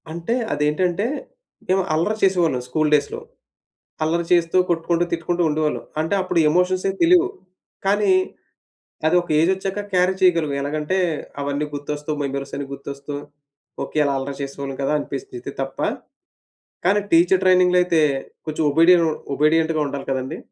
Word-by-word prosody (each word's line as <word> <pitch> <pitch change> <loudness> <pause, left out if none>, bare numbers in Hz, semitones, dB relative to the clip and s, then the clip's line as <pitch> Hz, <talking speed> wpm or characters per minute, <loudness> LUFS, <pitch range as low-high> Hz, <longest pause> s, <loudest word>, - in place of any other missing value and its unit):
అంటే, 170 +8 -2 0.2
అదేంటంటే 170 +7 0 0.6
మేం 185 +1 +2
అల్లరి 170 +8 0
చేసేవాళ్ళం 170 -9 +2
స్కూల్ 155 +4 0
డేస్‌లో. 145 -1 +1 0.9
అల్లరి 170 +2 0
చేస్తూ 170 0 +3
కొట్టుకుంటూ, 170 0 +1
తిట్టుకుంటూ 170 +1 -1
ఉండేవాళ్ళం. 155 0 -1 0.2
అంటే, 160 +5 0
అప్పుడు 185 - -1
ఎమోషన్స్ 180 +2 +1
ఏం - - -5
తెలియవు. 355 +2 +5 0.6
కానీ, 205 - +3 1.0
అది 165 - +3
ఒక 175 - -14
ఏజ్ 165 +3 +3
ఒచ్చాక 195 +2 -4
క్యారీ 180 +1 +3
చేయగలం. 170 -5 +3
ఎలాగంటే, 150 +5 -2 0.4
అవన్నీ 145 +1 -2
గుర్తొస్తూ 145 +1 -4
మెమోరీస్ 140 0 -4
అన్నీ 140 -1 -5
గుర్తొస్తూ, 140 +1 -7 0.7
ఓకె 155 - -3
అలా 140 - +1
అల్లరి 135 +1 -5
చేసేవాళ్ళం 140 0 -6
కదా 135 - +1
అనిపిస్తది 385 - -6
ఇది 380 - -7
తప్ప. - - -5 1.1
కానీ, 200 +3 +4
టీచర్ 175 +3 +5
ట్రైనింగ్‌లో 180 -1 +5
అయితే, 170 -3 +2 0.5
కొంచెం 155 +1 -1
ఒబిడియన్ 165 +2 +5 0.3
ఒబిడియంట్‌గా 160 +1 +2
ఉండాలి 140 -1 -6
కదండీ. 130 -1 -3
165 Hz, 135 wpm, -21 LUFS, 145-180 Hz, 1.1 s, తెలియవు